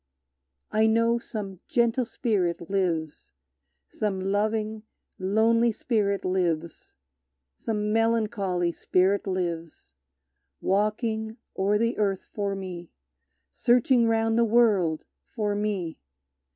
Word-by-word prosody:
I 220 Hz, +1 st, +3 dB
know 230 Hz, +1 st, +3 dB
some 200 Hz, -5 st, -6 dB
gentle 235 Hz, +1 st, +2 dB
spirit 185 Hz, -8 st, -1 dB
lives, 170 Hz, -6 st, -1 dB, 0.6 s
Some 200 Hz, -, -2 dB
loving, 215 Hz, +3 st, -1 dB, 0.4 s
lonely 225 Hz, +5 st, +3 dB
spirit 205 Hz, -3 st, -1 dB
lives, 170 Hz, -, -2 dB, 0.6 s
Some 210 Hz, -, -2 dB
melancholy 215 Hz, -6 st, +1 dB
spirit 190 Hz, +4 st, +1 dB
lives, 170 Hz, -, -4 dB, 0.7 s
Walking 220 Hz, +2 st, -1 dB, 0.2 s
o'er 200 Hz, +2 st, +2 dB
the 230 Hz, +1 st, 0 dB
earth 195 Hz, -2 st, 0 dB
for 200 Hz, -2 st, -2 dB
me, 180 Hz, -3 st, -7 dB, 0.6 s
Searching 240 Hz, 0 st, +3 dB
round 225 Hz, 0 st, +2 dB
the -, -, +5 dB
world 210 Hz, -9 st, +3 dB, 0.3 s
for 210 Hz, -3 st, 0 dB
me! 205 Hz, -5 st, -2 dB
210 Hz, 100 wpm, -26 LUFS, 185-225 Hz, 0.7 s, the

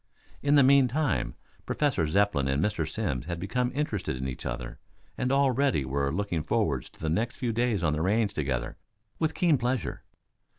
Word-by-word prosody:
In 145 Hz, +1 st, +3 dB
the 140 Hz, -, +7 dB
meantime 135 Hz, -, +3 dB, 0.3 s
Professor 125 Hz, -, +1 dB
Zepplin 95 Hz, -5 st, +2 dB
and 70 Hz, +1 st, +1 dB
Mr. 85 Hz, -4 st, 0 dB
Simms 65 Hz, +3 st, -3 dB
had 85 Hz, -1 st, -3 dB
become 125 Hz, +7 st, -1 dB
interested 110 Hz, -, -1 dB
in 65 Hz, +1 st, -3 dB
each 65 Hz, -, -5 dB
other -, -, -5 dB, 0.4 s
and 125 Hz, -, -1 dB
already 135 Hz, -, +2 dB
were 70 Hz, +1 st, -1 dB
looking 90 Hz, -2 st, -1 dB
forward -, -, 0 dB
to -, -, -15 dB
the 80 Hz, -, -3 dB
next 110 Hz, +10 st, 0 dB
few 125 Hz, -3 st, -1 dB
days 115 Hz, -5 st, 0 dB
on 75 Hz, -2 st, +2 dB
the 75 Hz, -, -1 dB
range 105 Hz, +3 st, +1 dB
together, 65 Hz, -7 st, -2 dB, 0.4 s
with 160 Hz, -1 st, 0 dB
keen 170 Hz, -7 st, +3 dB
pleasure. 120 Hz, -, -2 dB
100 Hz, 175 wpm, -28 LUFS, -, 0.4 s, the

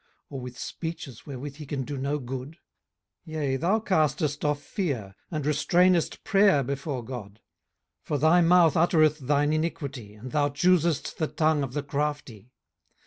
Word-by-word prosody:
or 135 Hz, -, -5 dB
with 125 Hz, 0 st, -8 dB
speeches 160 Hz, -7 st, -6 dB
wherewith 140 Hz, +1 st, -7 dB
he 155 Hz, -, -8 dB
can 135 Hz, -2 st, -2 dB
do 145 Hz, +3 st, -5 dB
no 140 Hz, +2 st, -1 dB
good? 130 Hz, +3 st, -6 dB, 0.7 s
18:015:004 160 Hz, -, -9 dB
Yea, 140 Hz, -4 st, 0 dB
thou 185 Hz, +9 st, +2 dB
castest 155 Hz, -, 0 dB
off 150 Hz, -1 st, +1 dB
fear, 135 Hz, -, -3 dB, 0.2 s
and 155 Hz, -4 st, -3 dB
restrainest 175 Hz, +3 st, +2 dB
prayer 195 Hz, -8 st, +4 dB
before 135 Hz, -1 st, -4 dB
God. 115 Hz, -6 st, -7 dB
18:015:005 -, -, -29 dB, 0.7 s
For 150 Hz, -, -1 dB
thy 160 Hz, +5 st, +5 dB
mouth 170 Hz, -2 st, +5 dB
uttereth 155 Hz, -2 st, +4 dB
thine 145 Hz, +2 st, +1 dB
iniquity, 140 Hz, -9 st, -3 dB
and 120 Hz, +4 st, -9 dB
thou 145 Hz, -1 st, +2 dB
choosest 170 Hz, 0 st, +1 dB
the 155 Hz, -, +1 dB
tongue 155 Hz, -1 st, +1 dB
of 135 Hz, -3 st, -3 dB
the 145 Hz, 0 st, -2 dB
crafty. 140 Hz, -6 st, -3 dB
145 Hz, 160 wpm, -27 LUFS, 135-160 Hz, 0.7 s, thy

